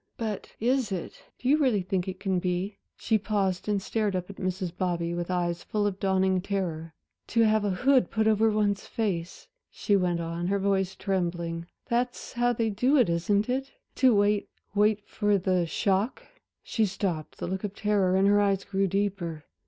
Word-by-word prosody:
But 220 -3 -4
is 250 -1 +1
it 185 -3 -5 0.2
do 250 - -5
you 295 +3 +5
really 245 -10 +2
think 185 0 -1
it 185 0 -5
can 190 -2 0
be?" 180 +3 -2 0.2
She 220 -1 +1
paused 200 -2 -1
and 205 -1 +2
stared 210 0 -1
up 180 +1 -3
at 195 - -14
Mrs. 185 -1 -3
Bobby 170 -2 -1
with 175 0 -3
eyes 175 -1 -1
full 210 -1 -1
of 205 - +1
a - - -20
dawning 190 -1 +2
terror. 170 -5 -3 0.3
"To 230 - +2
have 215 -1 +3
a 205 - +1
hood 255 +7 +3
put 220 -1 0
over 220 +1 +4
one's 205 -2 0
face," 180 -6 -3 0.2
she 205 - 0
went 180 -3 +1
on, 170 +1 -3
her 200 +1 +1
voice 195 -1 0
trembling, 170 -3 -2 0.2
"that's 245 +1 -2
how 240 0 +2
they 225 -2 0
do 250 +8 +2
it, 245 -9 +4
isn't 200 +5 +1
it? 265 +2 -2 0.2
to 255 -4 +5
wait 205 0 +2 0.2
wait 210 0 +2
for 205 -1 +1
the 185 -2 +1
shock."... 200 +6 0 0.4
She 220 -2 +1
stopped, 180 -5 -3
the - - -4
look 190 +3 -3
of 205 -1 -4
terror 200 -3 +2
in 190 +1 +4
her 205 +1 +5
eyes 195 -1 +1
grew 195 0 0
deeper. 185 -5 -2
195 Hz, 190 wpm, -27 LUFS, 180-215 Hz, 0.4 s, you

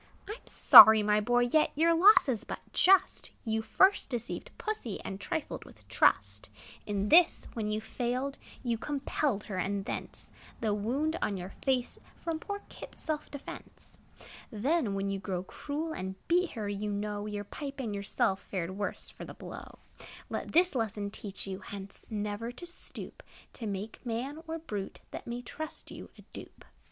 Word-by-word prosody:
I 420 - -4
'm 460 - -14
sorry, 220 -1 +10
my 210 0 +3
boy; 245 +3 +3
yet 275 +6 +3
Your 330 +3 +4
loss 375 +4 +7
is 235 -4 -1
but - - -6
just; 385 +1 +4 0.2
You 220 -1 0
first 380 - +3
deceived 240 -3 -4
Pussy, 425 - -3
And 195 +1 -6
trifled 320 - -3
with - - -17
trust. - - +2 0.4
In 205 0 -1
this, 345 +1 +6
when 220 -2 -2
you 215 +1 -1
failed, 255 +5 -3 0.2
You 235 -3 -1
compelled 275 -5 -1
her; 195 - -5
and 195 +1 -1
thence - - -6 0.3
The 215 -2 0
wound 275 +11 -1
on 200 - 0
your 180 +1 -6
face, 255 -2 0 0.2
From 330 -2 -3
poor 405 +4 -5
Kit's - - -11
self 305 -1 -2
defence. 285 -1 -10 0.5
Then, 235 0 0
when 195 0 -1
you 195 - -2
grew 185 -2 -3
cruel 300 - -4
And 190 -4 -5
beat 355 +1 +2
her, 215 -3 -4
you 205 +1 -3
know 205 0 -3
Your 205 -1 -4
pipe 275 +6 -7
and 230 -5 -3
yourself 200 -1 0
Fared 180 -3 -4
the - - -6
worst 200 +1 -4
for - - -9
the - - -9
blow. - - -9 0.5
Let - - -3
this 355 +1 +5
lesson 215 -4 -2
teach 200 -2 -5
you, 190 -1 -5
Hence 195 -1 -9
never 210 +2 -3
to 250 +8 -10
stoop 350 - -10 0.3
To 225 - -6
make 200 +2 -5
man, 260 +6 -3
or 325 0 -3
brute, 210 -12 -6
That - - -7
may 240 +1 -4
trust 315 +5 -7
you, - - -9
a - - -14
dupe. - - -11
230 Hz, 175 wpm, -31 LUFS, 205-295 Hz, 0.5 s, sorry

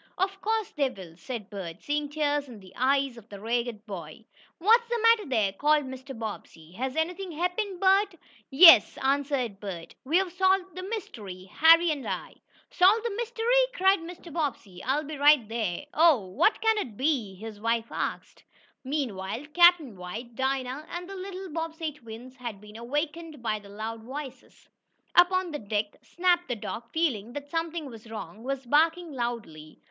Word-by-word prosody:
"Of 390 +1 -1
course 440 0 -1
they 280 -3 +1
will," 185 -8 -11
said 220 +1 -7
Bert, 185 -3 -7
seeing 295 0 -1
tears 290 -1 0
in 230 -4 -10
the 190 -1 -15
eyes 270 0 +1
of 225 -1 -14
the 200 - -9
ragged 230 0 -2
boy. 185 -1 -8 0.3
"What's 460 +6 +4
the 475 - 0
matter 455 -6 +4
there?" 215 -6 +1
called 295 +6 +2
Mr. 260 0 -8
Bobbsey. 200 -7 -7
"Has 255 +7 -4
anything 355 +4 -2
happened, 360 +4 -2
Bert?" 390 0 +3 0.3
"Yes," 305 - +8
answered 270 -6 0
Bert. 185 -5 -7
"We've 350 +7 +1
solved 375 0 +1
the 370 - -5
mystery 225 - -6
Harry 330 +1 +6
and 285 -3 -4
I." - - -4 0.4
"Solved 415 +6 +4
the 450 -4 -2
mystery!" 475 +2 +2
cried 385 -1 +4
Mr. 340 -1 -10
Bobbsey. 240 - -3
"I'll 275 +4 0
be 300 0 -7
right 290 -5 +5
there." 220 -1 -3
"Oh, 310 - +5
what 185 - +2
can 445 -1 +3
it 230 - -5
be?" 255 -9 0
his 210 +1 -9
wife 230 0 0
asked. - - -4 0.4
Meanwhile, 245 -4 -3
Captain 345 - +5
White, 215 +7 -7
Dinah 265 +3 -2
and 350 +1 -6
the 390 - -8
little 380 0 -6
Bobbsey 325 0 -3
twins 250 -1 -11
had 235 -5 -6
been 210 +1 -14
awakened 295 +3 -4
by 215 -2 -1
the 205 -1 -15
loud 220 +2 -6
voices. 265 +1 -9 0.5
Up 350 +1 +6
on 370 -2 0
deck 210 -6 -2
Snap, 350 0 +1
the 245 - -2
dog, 230 +2 -6
feeling 240 -9 -1
that 285 0 -7
something 330 -1 -2
was 230 -4 -11
wrong, 220 0 -8
was 270 0 -3
barking 325 +5 +2
loudly. 230 - -5
275 Hz, 170 wpm, -27 LUFS, 225-345 Hz, 0.5 s, Yes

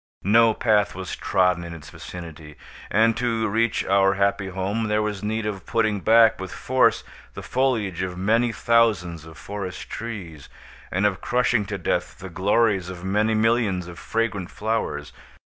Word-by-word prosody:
No 110 +2 +4
path 105 -3 +2
was 95 -1 -5
trodden 90 -2 +1
in 85 0 -7
its 75 -2 -12
vicinity; 80 -4 -10 0.3
and, 110 +2 +3
to 115 -2 0
reach 115 +2 0
our 95 0 +3
happy 100 0 +1
home, 95 +4 -2
there 105 0 +1
was 105 -2 -3
need 110 +1 -2
of 100 -4 -5
putting 110 -3 +1
back, 115 0 +5
with 95 -1 -6
force, 130 0 +2 0.3
the - - -7
foliage 115 -9 0
of 90 -1 -4
many 115 +5 +2
thousands 105 -9 +1
of 80 -1 -13
forest 100 -3 -7
trees, 95 -10 -7 0.4
and 95 +3 0
of 100 -3 0
crushing 125 -3 +1
to 100 - -3
death 90 - -2
the 95 - -9
glories 95 +1 +1
of 90 -1 -8
many 105 +3 +1
millions 110 -5 +1
of 85 -3 -10
fragrant 105 -1 -2
flowers. 75 - -3
100 Hz, 165 wpm, -23 LUFS, 90-115 Hz, 0.4 s, back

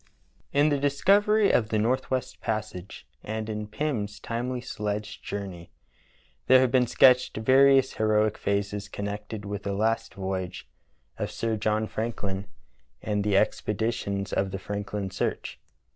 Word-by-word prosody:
IN 145 +2 +4
"The 145 -1 +1
Discovery 200 +9 +3
of 110 -2 +2
the 110 - +1
Northwest 130 +3 -1
Passage" 105 -4 -4 0.2
and 110 0 -4
in 105 -1 -4
"Pirn's 105 -4 -3
Timely 125 +2 -3
Sledge 105 -3 -4
Journey" 95 -4 -6 0.8
there 130 0 +8
have 130 -2 +3
been 125 -1 +3
sketched 125 0 +5
various 135 +3 +5
heroic 110 0 +2
phases 100 0 -2
connected 100 +1 -5
with 100 0 -4
the 100 - -3
last 115 +2 0
voyage 95 -2 -4 0.5
of - - -2
Sir 115 -1 -2
John 110 0 0
Franklin 105 -3 -3 0.6
and 105 -1 0
the 100 -1 +2
expeditions 105 -2 -1
of 95 - +1
the 95 - -4
Franklin 100 0 -4
search. 95 - -3
110 Hz, 135 wpm, -27 LUFS, 100-125 Hz, 0.8 s, there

